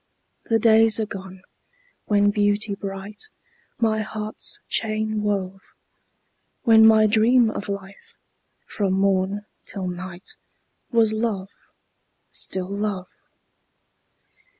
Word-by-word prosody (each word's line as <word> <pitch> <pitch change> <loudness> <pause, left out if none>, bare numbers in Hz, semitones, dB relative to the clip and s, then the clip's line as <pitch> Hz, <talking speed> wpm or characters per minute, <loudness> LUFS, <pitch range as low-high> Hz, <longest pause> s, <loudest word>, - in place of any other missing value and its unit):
the 225 - +2
days 225 0 +4
are 220 - 0
gone, 190 -2 -9 0.6
when 205 -1 +3
Beauty 205 0 +1
bright 200 - -7 0.5
My 220 -2 +1
heart's 215 0 -4
chain 215 -1 -1
wove; 195 -2 -2 1.0
When 220 -3 +7
my 220 -1 +6
dream 225 +2 +4
of 205 - -6
life, 200 0 -8 0.5
from 200 -3 -1
morn 195 +1 +1 0.2
till 190 -3 -5
night, 180 0 -7 0.5
Was 225 -3 +3
love, 215 -4 -2 0.8
still 185 -1 0
love. 200 -3 -3
205 Hz, 100 wpm, -23 LUFS, 195-220 Hz, 1.0 s, When